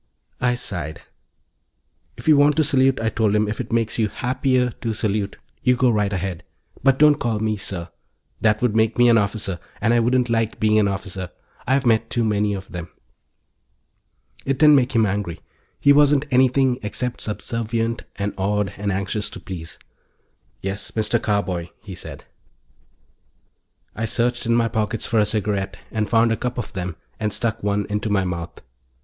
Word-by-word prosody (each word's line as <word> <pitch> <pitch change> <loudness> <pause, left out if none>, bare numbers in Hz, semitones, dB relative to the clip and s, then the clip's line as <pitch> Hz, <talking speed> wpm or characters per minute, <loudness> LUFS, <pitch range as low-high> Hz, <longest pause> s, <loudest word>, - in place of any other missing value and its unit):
I 125 0 +2
sighed. 85 -10 -5 1.1
"If - - -10
you 155 - +7
want 145 +1 +5
to 155 - +3
salute," 135 -2 +3
I 110 - 0
told 110 -2 +1
him, 105 0 +2
"if 105 - -3
it - - -8
makes 115 -1 0
you 110 - +3
happier 125 +2 0
to 115 0 -4
salute, 105 -2 -1 0.2
you 125 0 +3
go 125 0 +3
right 105 -2 +1
ahead. 95 -2 -3 0.4
But 135 0 +4
don't 150 0 +5
call 115 -3 -1
me 110 0 0
'Sir.' 95 -4 -5 0.5
That 110 +1 +2
would 115 -3 +2
make 110 0 +2
me 120 0 +6
an 115 -1 +6
officer, 100 -3 -2 0.2
and 115 - +2
I 120 - +4
wouldn't 125 +1 +2
like 115 -1 0
being 110 0 +3
an 105 - +3
officer. 95 -2 -4 0.4
I've 135 +1 +2
met 115 -1 +2
too 120 - 0
many 105 -1 +1
of 95 0 -8
them." 90 -1 -6 1.6
It 135 -1 -1
didn't 150 +1 +7
make 130 -2 +3
him 110 -1 +5
angry. 100 -4 -2 0.4
He 145 - +6
wasn't 145 0 +4
anything 130 0 +3
except 120 +4 -3
subservient 115 +1 -2
and 100 0 -2
awed 100 +1 0
and 100 0 -1
anxious 100 +2 -2
to - - -9
please. 85 -3 -8 0.8
"Yes, 95 +2 -4
Mr. 110 +1 0
Carboy," 95 -5 -1
he 100 -3 -8
said. - - -8 1.7
I 115 - -2
searched 120 +1 0
in 115 - +3
my 115 -1 +3
pockets 110 0 -1
for 115 - +1
a 105 - +3
cigarette 105 -2 -1
and 110 -2 -1
found 115 0 +4
a 115 - +1
cup 125 0 -3
of 120 -4 -5
them 90 -3 -4 0.2
and 105 -1 -1
stuck 110 +1 -2
one 100 0 0
into 105 +1 -2
my 100 -2 +2
mouth. 85 -2 -5
110 Hz, 180 wpm, -22 LUFS, 100-120 Hz, 1.7 s, you